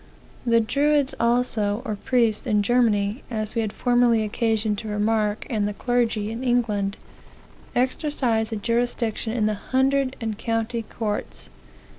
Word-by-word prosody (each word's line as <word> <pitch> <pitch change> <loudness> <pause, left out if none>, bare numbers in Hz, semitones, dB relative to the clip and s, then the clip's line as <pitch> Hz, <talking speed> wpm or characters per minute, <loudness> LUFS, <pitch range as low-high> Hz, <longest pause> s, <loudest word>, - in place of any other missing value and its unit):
"The 230 0 +5
druids 280 +4 +2
also, 235 -2 +1
or 215 -4 -2
priests, 230 +2 +1
in 210 -3 +2
Germany, 215 -1 +2
as 215 -3 -3
we 230 - 0
had 215 -2 -2
formerly 240 -2 +3
occasion 220 0 0
to 220 - -6
remark, 210 0 0
and 215 -5 0
the 205 - -4
clergy 230 -4 0
in 230 +3 -5
England, 215 -5 0 0.8
exercised 250 -3 0
a - - -1
jurisdiction 230 0 -1
in 225 -3 +1
the 215 - +1
hundred 265 +4 +1
and 220 -3 -4
county 225 +1 -1
courts. 215 -1 -5
225 Hz, 140 wpm, -24 LUFS, 215-245 Hz, 0.8 s, The